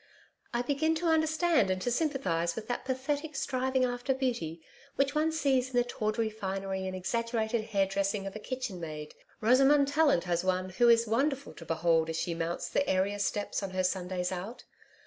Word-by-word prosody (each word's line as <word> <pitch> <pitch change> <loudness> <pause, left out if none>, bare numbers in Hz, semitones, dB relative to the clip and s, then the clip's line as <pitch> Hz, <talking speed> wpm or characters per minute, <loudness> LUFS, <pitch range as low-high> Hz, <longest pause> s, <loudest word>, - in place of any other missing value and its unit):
I 240 0 0
begin 305 +5 +1
to 335 +2 -3
understand 315 - +3
and 185 0 0
to 245 - 0
sympathise 240 - 0
with 220 -1 -6
that 245 - -2
pathetic 285 +4 -2
striving 260 -1 0
after 245 +2 -1
beauty 235 -12 -2 0.4
which 275 0 +1
one 310 +1 +2
sees 270 -5 +1
in 260 - -8
the 245 - +4
tawdry 225 -1 -1
finery 195 -2 -3
and 185 - -4
exaggerated 230 +3 -1
hairdressing 195 0 0
of 195 - -6
a - - -5
kitchenmaid 180 -12 -5 0.3
Rosamond 270 +5 +5
Tallant 285 - +3
has 175 -1 0
one 185 0 0
who 235 +6 +4
is 230 0 +5
wonderful 275 +5 0
to 165 - -11
behold 165 0 +2
as 160 - -2
she 170 - -1
mounts 165 +1 -3
the 280 - 0
area 195 +2 +1
steps 205 +1 -1
on 195 - -3
her 185 0 -1
Sundays 180 -1 -1
out. 200 +7 -6
225 Hz, 180 wpm, -30 LUFS, 185-270 Hz, 0.4 s, Rosamond